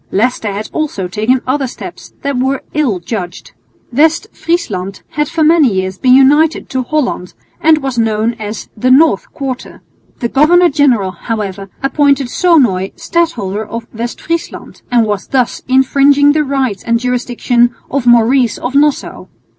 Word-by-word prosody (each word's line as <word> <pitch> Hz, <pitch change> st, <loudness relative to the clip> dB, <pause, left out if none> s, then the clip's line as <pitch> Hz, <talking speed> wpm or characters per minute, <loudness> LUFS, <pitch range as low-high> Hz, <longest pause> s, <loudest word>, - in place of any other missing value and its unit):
Leicester 220 Hz, 0 st, 0 dB
had 205 Hz, +2 st, -5 dB
also 285 Hz, -12 st, -2 dB
taken 220 Hz, +7 st, 0 dB
other 270 Hz, +1 st, -1 dB
steps -, -, -10 dB
that 280 Hz, -1 st, -1 dB
were 265 Hz, +2 st, -1 dB
ill 275 Hz, -11 st, 0 dB
judged. 180 Hz, -2 st, -6 dB, 0.4 s
West 315 Hz, +5 st, +2 dB
Friesland 200 Hz, -, -3 dB
had 295 Hz, 0 st, -2 dB
for 325 Hz, -1 st, 0 dB
many 310 Hz, -5 st, +4 dB
years 190 Hz, 0 st, -3 dB
been 255 Hz, 0 st, +5 dB
united 295 Hz, +4 st, +3 dB
to 260 Hz, -, -1 dB
Holland 250 Hz, -, -2 dB, 0.3 s
and 310 Hz, -2 st, +3 dB
was 265 Hz, -3 st, -2 dB
known 225 Hz, +1 st, 0 dB
as 215 Hz, 0 st, -6 dB
the 250 Hz, +4 st, 0 dB
North 265 Hz, -5 st, +3 dB
Quarter. 265 Hz, -2 st, -6 dB, 0.3 s
The 235 Hz, -, -2 dB
governor 340 Hz, +7 st, +4 dB
general, 255 Hz, -10 st, +2 dB
however, 200 Hz, 0 st, -5 dB
appointed 275 Hz, -1 st, +2 dB
Sonoy 245 Hz, -, +2 dB
Stadholder 320 Hz, -, -2 dB
of 230 Hz, +2 st, -7 dB
West 235 Hz, +2 st, -5 dB
Friesland, 335 Hz, 0 st, -5 dB
and 240 Hz, -2 st, +3 dB
was 205 Hz, -2 st, -3 dB
thus 255 Hz, -3 st, 0 dB
infringing 275 Hz, +2 st, +4 dB
the 305 Hz, +1 st, +1 dB
rights 265 Hz, -7 st, -1 dB
and 235 Hz, 0 st, +1 dB
jurisdiction 245 Hz, -1 st, 0 dB, 0.2 s
of 270 Hz, -3 st, -1 dB
Maurice 240 Hz, 0 st, +3 dB
of 245 Hz, -, -4 dB
Nassau. 290 Hz, 0 st, 0 dB
255 Hz, 150 wpm, -14 LUFS, 220-290 Hz, 0.4 s, been